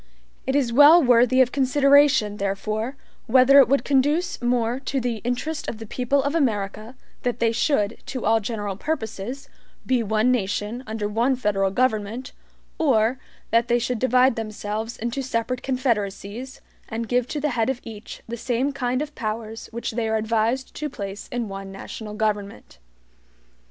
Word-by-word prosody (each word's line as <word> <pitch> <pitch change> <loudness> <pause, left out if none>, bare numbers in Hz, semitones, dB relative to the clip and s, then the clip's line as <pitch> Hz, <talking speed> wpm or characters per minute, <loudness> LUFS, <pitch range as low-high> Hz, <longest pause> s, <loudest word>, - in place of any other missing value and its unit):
It 265 - 0
is 255 -5 +1
well 295 +6 +8
worthy 250 +1 +5
of 250 -1 +3
consideration 275 -4 +4
therefore, 215 +5 -2 0.3
whether 260 +3 +7
it 265 - +7
would 265 0 +1
conduce 290 +5 +1
more 240 0 0
to 270 0 -2
the 240 -2 -2
interest 250 +7 -3
of 220 - -4
the 225 - -8
people 255 +5 0
of 285 +1 -1
America 220 -5 -1 0.3
that 245 -1 -1
they 230 -2 +2
should, 230 -3 0
to 265 -2 -4
all 225 +1 +4
general 205 -2 -4
purposes, 260 0 -4 0.4
be 255 -2 +2
one 220 +3 +2
nation, 215 +1 -2
under 220 -1 -3
one 235 +6 +1
federal 200 -5 0
government, 225 +2 -1 0.5
or 250 -5 +2 0.3
that 230 +1 +3
they 240 - +3
should 240 0 -2
divide 255 0 +4
themselves 215 +1 -4
into 235 +4 -3
separate 250 -1 -2
confederacies, 240 -1 -2 0.3
and 230 0 -4
give 245 0 +1
to 295 - -3
the 300 +1 0
head 230 0 0
of 265 -2 -2
each 220 -2 -9
the 235 +1 -5
same 255 +3 -1
kind 255 0 -1
of 300 0 -9
powers 220 -2 -5
which 235 +1 -4
they 225 0 -2
are 220 - +1
advised 225 +4 0
to 300 -1 -3
place 200 -5 -7
in 245 -2 -2
one 195 0 -7
national 210 +2 -8
government. 205 - -3
235 Hz, 165 wpm, -23 LUFS, 215-260 Hz, 0.5 s, well